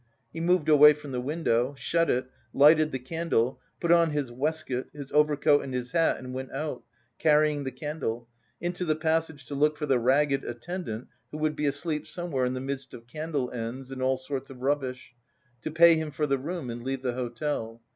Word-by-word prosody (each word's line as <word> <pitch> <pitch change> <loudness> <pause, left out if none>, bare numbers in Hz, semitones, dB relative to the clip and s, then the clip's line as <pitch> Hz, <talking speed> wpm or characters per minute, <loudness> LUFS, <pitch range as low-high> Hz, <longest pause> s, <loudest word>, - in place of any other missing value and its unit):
He 165 - -5
moved 175 -2 +2
away 150 -1 +8
from 150 -1 -10
the 125 -1 -2
window, 135 -3 0
shut 165 +4 +1
it, 125 +1 +1 0.3
lighted 155 +2 +6
the 130 - -2
candle, 130 -3 -1 0.2
put 170 - +1
on 170 -1 +5
his 145 -5 -2
waistcoat, 135 0 -2
his 140 -2 -8
overcoat 150 -1 +4
and 130 -2 -5
his 125 0 -3
hat 165 -1 +2
and 130 0 -8
went 130 0 -5
out, 140 -2 -4 0.4
carrying 150 -2 +3
the 130 - -2
candle, 130 -4 -4 0.3
into 175 +1 -3
the 155 -3 +1
passage 160 -3 -1
to 130 - -7
look 150 +2 +2
for 150 - -2
the 135 -4 +2
ragged 135 +3 +2
attendant 120 -1 -5 0.2
who 150 - -7
would 155 0 0
be 150 0 0
asleep 150 +2 -2
somewhere 170 -8 -2
in 125 - -1
the 130 - -3
midst 135 0 -5
of 115 - -12
candle 150 -1 -3
ends 125 +3 -5
and 130 -1 -6
all 130 0 +2
sorts 135 +1 -5
of 130 -1 -11
rubbish, 130 -3 -2 0.5
to - - -3
pay 165 +2 +7
him 160 -1 -1
for 150 +1 -1
the 140 -2 +1
room 150 -3 -4
and 120 +1 -6
leave 135 0 -3
the 125 -2 0
hotel. 120 -1 -3
145 Hz, 205 wpm, -27 LUFS, 130-155 Hz, 0.5 s, away